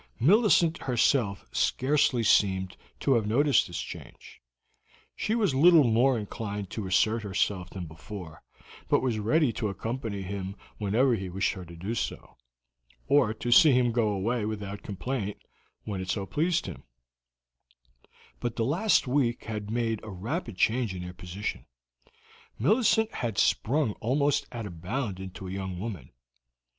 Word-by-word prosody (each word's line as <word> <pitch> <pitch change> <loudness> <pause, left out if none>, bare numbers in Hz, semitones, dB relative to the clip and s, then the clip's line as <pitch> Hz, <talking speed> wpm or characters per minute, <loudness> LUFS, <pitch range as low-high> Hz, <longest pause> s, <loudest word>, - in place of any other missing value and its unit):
Millicent 175 - +4
herself 120 -4 +1
scarcely 130 -3 +2
seemed 95 -3 +2 0.3
to 135 - +3
have 115 -4 +1
noticed 140 +6 +3
this - - -5
change. - - -10 0.7
She 220 - -1
was 210 - +2
little 160 +3 +7
more 120 +2 +3
inclined 105 -2 -5
to 105 -4 -4
assert 110 +4 +2
herself 95 -2 -1
than 90 -1 -6
before, 80 +1 -9 0.5
but - - +2
was 120 -4 0
ready 130 +4 +2
to 110 - -2
accompany 110 0 -4
him 95 0 -5 0.2
whenever 115 +6 +2
he 95 -4 -3
wished 95 +2 0
her 95 -3 -8
to 85 0 -11
do 95 +7 -4
so, - - -4 0.7
or 140 -6 +3
to 120 +2 -3
see 150 +3 +8
him 125 -1 +3
go 115 -1 +1
away 105 +4 -1
without 105 -1 -4
complaint, 105 +1 -4 0.5
when 100 -3 -4
it 95 - -6
so 100 -1 -1
pleased 165 - 0
him; 95 - -7 1.6
but 120 -1 -3
the 115 - 0
last 180 - +2
week 125 -2 0
had 105 -2 -5
made 115 -1 -1
a 110 - -8
rapid 115 - -4
change 115 -1 +1
in 90 - -6
their 90 0 -7
position. 90 +3 -6 0.9
Millicent 220 - +3
had 115 -4 -3
sprung 135 +2 +2
almost 140 +4 +1
at 115 -3 -5
a 100 - -6
bound 95 +4 -4
into 95 0 -8
a - - -6
young 95 -1 -4
woman. 95 - -6
110 Hz, 150 wpm, -28 LUFS, 95-130 Hz, 1.6 s, see